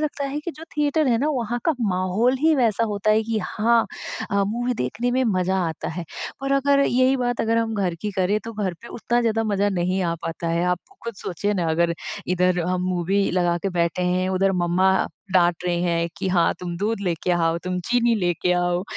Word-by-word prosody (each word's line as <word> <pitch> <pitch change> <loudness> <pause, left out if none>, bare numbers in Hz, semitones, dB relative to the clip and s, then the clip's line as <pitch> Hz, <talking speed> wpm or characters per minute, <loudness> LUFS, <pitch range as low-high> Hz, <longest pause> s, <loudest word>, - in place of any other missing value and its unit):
लगता 295 -2 -2
है 280 +2 -3
कि 345 - -5
जो 320 - -9
थिएटर 295 0 +2
है 230 -2 +3
ना, 290 +4 +1
वहाँ 240 -3 -1
का 325 - +3
माहौल 195 +5 +1
ही 320 0 +4
वैसा 230 -3 +2
होता 205 +1 0
है 215 +1 +4
कि 220 0 -1
हाँ 230 +4 +2 0.5
अ, 200 0 +2
मूवी 240 +4 -1
देखने 225 - -2
में 260 +1 +1
मज़ा 185 +1 +1
आता 160 - -5
है 170 +1 -5 0.4
और 275 0 0
अगर 280 0 +3
यही 255 +2 +3
बात 245 -1 -1
अगर 230 +1 +1
हम 225 -1 -1
घर 185 -4 0
की 210 - -2
करें, 190 +3 +1
तो 230 - -6
घर 200 -4 -2
पे 235 - -10
उतना 240 +1 -1
ज़्यादा 225 -1 +1
मज़ा 205 -1 +1
नहीं 185 0 0
आ 170 -1 0
पाता 165 0 -4
है। 170 +1 +1
आप 180 -1 +1 0.3
खुद 235 - -4
सोचिए 200 +4 -2
ना, 170 -3 0
अगर 170 +1 +1 0.3
इधर 180 0 +2
हम 180 0 0
मूवी 185 +3 +1
लगा 175 -1 +1
के 195 - 0
बैठे 175 +1 0
हैं, 180 +1 +1
उधर 190 +1 +2
मम्मा 185 +2 +3 0.4
डाँट 175 -1 +3
रहे 175 -1 +1
हैं 170 -1 0
कि, 190 - -1
"हाँ, 180 -2 +3
तुम 175 -1 -4
दूध 210 +2 -1
लेके 180 -2 -1
आओ। 165 -1 +1
तुम 180 0 -2
चीनी 240 -1 +3
लेके 180 -3 0
आओ।" 175 0 +1
195 Hz, 220 wpm, -23 LUFS, 180-235 Hz, 0.5 s, ही